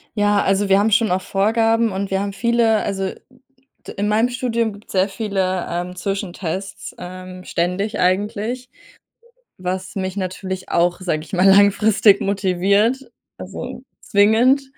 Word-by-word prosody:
Ja, 205 -1 +2
also, 195 +1 +1
wir 195 +1 +5
haben 220 +2 +2
schon 215 0 +3
auch 185 +1 +1
Vorgaben 225 +3 +1
und 195 +1 -4
wir 190 - +1
haben 200 0 -3
viele, 230 0 +2
also 195 -1 -2 0.8
d - - -6
in 205 +1 0
meinem 220 +3 +2
Studium 235 -3 -1
gibt 205 +1 -15
es - - -12
sehr 190 +1 +2
viele, 190 -4 -2
ähm, 180 +1 -4
Zwischentests, 195 -1 -4
ähm, 185 0 -9
ständig 180 +5 -2
eigentlich, 210 +7 -1 0.9
was 185 +2 -4
mich 190 0 -3
natürlich 185 0 -4
auch, 175 +1 +1
sage 155 -4 -1
ich 180 - -16
mal, 185 +1 +3
langfristig 200 +1 +5
motiviert, 200 +6 +1 0.3
also, 245 +7 -7 0.2
zwingend. 225 +7 +3
200 Hz, 145 wpm, -20 LUFS, 185-220 Hz, 0.9 s, wir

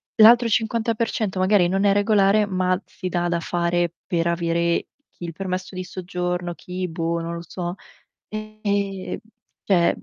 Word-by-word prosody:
l'altro 235 +2 +8
50% 225 -2 0
magari 185 -1 +4
non 195 +2 +1
è 200 - +5
regolare, 205 0 +4
ma 185 -1 +1
si 185 -2 -6
dà 175 0 0
da 170 -1 0
fare, 175 0 0
per 170 -2 0
avere 170 0 +1 0.2
chi - - -13
il 170 -1 -4
permesso 185 +1 -4
di 185 - -3
soggiorno, 180 -1 -3
chi, 180 +1 -4
boh, 165 0 -1
non 170 +1 -4
lo 170 - -5
so. 175 0 -4 0.5
Ehm 205 -3 -3 0.5
cioè, 175 -4 +3
mhmm, - - -14
185 Hz, 155 wpm, -23 LUFS, 175-205 Hz, 0.5 s, l'altro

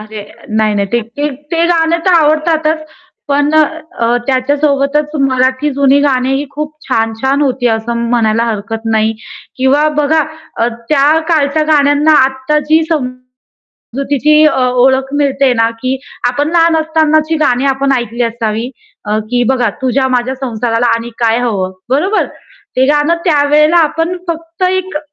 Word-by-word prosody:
अरे, 215 0 -8 0.4
नाही, 215 -1 +1
नाही. 200 -1 0
ते 240 +6 -2 0.2
ते 335 0 +2
गाणं 335 -1 +1
तर 370 - +4
आवडतातच. 315 0 +1 0.4
पण 290 +1 +1
अ, 315 -4 0 0.2
त्याच्यासोबतच 280 +2 0
मराठी 260 +1 +1
जुनी 275 0 +3
गाणी 265 -2 +1
ही 285 +1 -3
खूप 300 +1 -5 0.2
छान-छान 225 +6 0
होती 255 -2 0
असं 235 +1 -3
म्हणायला 230 -1 +1
हरकत 225 0 -4
नाही 220 0 +1 0.4
किंवा 275 +4 +2
बघा, 305 +2 +2 0.4
अ, 230 - +2 0.2
त्या 300 +1 +3
काळच्या 310 -2 +1
गाण्यांना 290 +1 +3
आत्ता 265 +3 -1
जी 315 +1 +4 0.9
समजुतीची 280 +3 -1
अ, 270 -4 +2 0.2
ओळख 265 +1 +1
मिळते 275 -1 +2
ना, 230 -1 +2
की 260 +1 -1 0.3
आपण 290 +5 -1
लहान 335 -1 +3
असतानाची 315 0 +1
गाणी 250 -1 +1
आपण 275 +1 -1
ऐकली 240 0 -3
असावी, 230 0 -2 0.4
अ, 210 +1 -1
की 245 0 +1
बघा 250 -4 +1
तुझ्या 265 +1 +1
माझ्या 250 +2 -1
संसाराला 240 -2 -2
आणि 230 +1 -5
काय 230 -1 +2
हवं? 200 -6 -2 0.2
बरोबर. 370 +11 +1 0.5
ते 260 - +3
गाणं 295 +4 +2
त्यावेळेला 300 +1 +3
आपण 325 +2 0
फक्त 330 +2 -5
एक 375 -4 -2
275 Hz, 140 wpm, -13 LUFS, 240-305 Hz, 0.9 s, तर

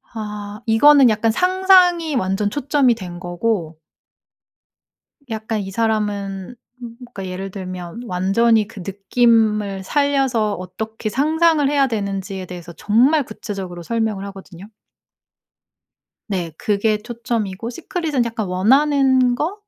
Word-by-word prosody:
아 210 -1 -6
이거는 265 +3 +6
약간 220 +1 +1
상상이 365 - +3
완전 205 -2 0
초점이 275 -1 +2
된 180 -5 -8
거고 175 -2 -2 1.5
약간 220 -1 -3
이 195 - -5
사람은 205 -1 -2 0.4
그러니까 235 -6 -9
예를 185 +1 -5
들면 185 +2 -7
완전히 210 +4 +2
그 210 -2 -11
느낌을 210 0 +1
살려서 270 -5 +1
어떻게 220 +5 -6
상상을 310 +4 +2
해야 280 -2 +3
되는지에 195 -4 -4
대해서 175 -1 -9
정말 255 - +3
구체적으로 190 -7 -7
설명을 220 0 -2
하거든요. 195 -1 -11 1.6
네. 180 -6 -3
그게 210 +3 +1
초점이고 230 -2 -4
시크릿은 305 -2 -2
약간 225 -2 -3
"원하는 260 +6 +3
거" 310 +9 -2
220 Hz, 265 characters per minute, -20 LUFS, 195-255 Hz, 1.6 s, 이거는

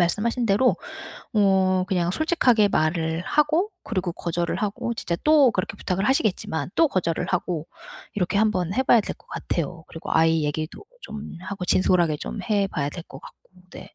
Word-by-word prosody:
말씀하신 230 +7 +1
대로 210 +6 +3 0.6
어 190 -2 +3
그냥 175 -3 +1
솔직하게 245 - +3
말을 160 0 0
하고 310 - +1
그리고 185 -5 -2
거절을 170 0 -2
하고 210 +3 -2
진짜 170 -5 -2
또 300 -4 +6
그렇게 185 +2 -3
부탁을 190 +1 -2
하시겠지만 190 - 0
또 325 - +5
거절을 170 -7 -1
하고 180 -3 -2 0.5
이렇게 190 +1 0
한번 190 -4 +1
해 260 - +2
봐야 240 -3 +5
될 - - -5
것 - - -27
같아요. 170 0 -4
그리고 165 - -8
아이 160 -1 +3
얘기도 155 - -4 0.2
좀 215 -5 -8
하고 190 -1 -5
진솔하게 175 -4 +3
좀 210 - -5
해 200 -2 +3
봐야 145 -4 -2
될 170 - -7
것 - - -12
같고 - - -14 0.3
네. 185 +2 -10
185 Hz, 355 characters per minute, -24 LUFS, 170-215 Hz, 0.6 s, 또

